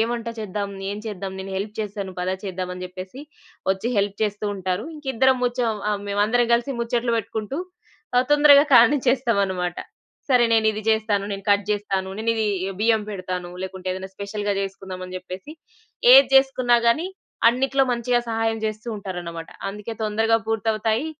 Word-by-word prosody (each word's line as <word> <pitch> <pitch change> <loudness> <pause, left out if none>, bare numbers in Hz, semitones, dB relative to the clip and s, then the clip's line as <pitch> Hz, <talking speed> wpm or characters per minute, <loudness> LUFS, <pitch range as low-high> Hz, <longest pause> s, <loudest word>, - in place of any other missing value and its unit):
వంట 235 -1 -3
చేద్దాం? 205 -1 -3 0.2
ఏం 205 - -4
చేద్దాం? 195 -2 -5
నేను 195 0 -7
హెల్ప్ 205 +2 -4
చేస్తాను. 200 -2 -5
పద 185 +1 -1
చేద్దాం" 185 -1 -4
అని 180 0 -6
చెప్పేసి 185 +9 -9 0.5
ఒచ్చి 210 +6 -3
హెల్ప్ 200 0 0
చేస్తూ 210 0 -2
ఉంటారు. 185 +2 -2
ఇంకిద్దరం 265 -2 +2
ముచ్చం 240 -4 0
ఆహ్, 205 -1 -1
మేమందరం 215 +4 +2
గలిసి 240 +4 +1
ముచ్చట్లు 235 0 0
వెట్టుకుంటూ, 220 +4 -3 0.6
ఆహ్, 250 +1 +4
తొందరగా 290 0 +7
కానిచ్చేస్తామనమాట. 230 -8 +3 0.5
"సరే, 245 -2 +5
నేనిది 220 -1 +2
జేస్తాను. 215 -2 +1
నేను 195 0 -6
కట్ 200 -1 +3
జేస్తాను. 195 -2 -2
నేనిదీ 225 -1 0 0.4
బియ్యం 220 -1 +3
పెడతాను. 185 -2 -5
లేకుంటే, 190 0 -6
ఏదన్నా 190 0 -7
స్పెషల్‌గా 205 0 -3
జేసుకుందామని" 185 -1 -6
చెప్పేసి 185 - -9 0.6
ఏది - - +9
జేసుకున్నా 255 -3 +4
గానీ, 315 +10 +1 0.4
అన్నిటిలో 270 +3 +2
మంచిగా 240 0 +1
సహాయం 225 0 0
జేస్తూ 215 +2 -4
ఉంటారనమాట. 175 -5 -6 0.2
అందుకే 210 +3 -6
తొందరగా 220 +1 +2
పూర్తవుతాయి. 225 +3 0
215 Hz, 140 wpm, -23 LUFS, 195-235 Hz, 0.6 s, ఏది